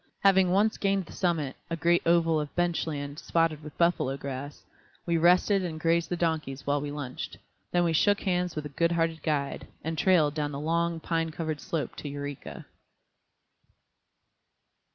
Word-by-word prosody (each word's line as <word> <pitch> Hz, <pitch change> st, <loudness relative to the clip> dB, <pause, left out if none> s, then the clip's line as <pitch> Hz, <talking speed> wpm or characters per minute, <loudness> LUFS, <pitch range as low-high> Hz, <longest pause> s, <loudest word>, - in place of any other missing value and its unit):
Having 190 Hz, -2 st, +5 dB
once 205 Hz, +4 st, +2 dB
gained 195 Hz, -2 st, +1 dB
the -, -, -13 dB
summit, 160 Hz, -7 st, -1 dB
a 165 Hz, -, -1 dB
great 170 Hz, +2 st, +3 dB
oval 165 Hz, -2 st, +4 dB
of 150 Hz, -1 st, -5 dB
bench 175 Hz, -2 st, 0 dB
land 145 Hz, -1 st, -4 dB
spotted 165 Hz, -2 st, +1 dB
with 150 Hz, -1 st, -11 dB
buffalo 170 Hz, -6 st, +2 dB
grass, 140 Hz, +1 st, -6 dB, 0.4 s
we 170 Hz, -, +1 dB
rested 180 Hz, +4 st, +4 dB
and 160 Hz, -3 st, -4 dB
grazed 165 Hz, +1 st, +2 dB
the 175 Hz, -, 0 dB
donkeys 160 Hz, -5 st, -2 dB
while 145 Hz, 0 st, +1 dB
we 145 Hz, -, -4 dB
lunched; 145 Hz, -3 st, -6 dB, 0.3 s
then 175 Hz, 0 st, +3 dB
we 170 Hz, -1 st, +1 dB
shook 205 Hz, +6 st, +3 dB
hands 180 Hz, -2 st, 0 dB
with 150 Hz, -, -3 dB
the 150 Hz, -, -6 dB
good 170 Hz, +4 st, +1 dB
hearted 165 Hz, -1 st, 0 dB
guide, 145 Hz, -3 st, -2 dB, 0.2 s
and 160 Hz, -1 st, -3 dB
trailed 160 Hz, -6 st, +4 dB
down 150 Hz, -1 st, -2 dB
the 140 Hz, -, -4 dB
long, 170 Hz, +2 st, 0 dB
pine 165 Hz, 0 st, -1 dB
covered 155 Hz, -2 st, -4 dB
slope 160 Hz, -3 st, -3 dB
to 145 Hz, -, -5 dB
Eureka. 145 Hz, 0 st, -6 dB
165 Hz, 175 wpm, -28 LUFS, 145-175 Hz, 0.4 s, Having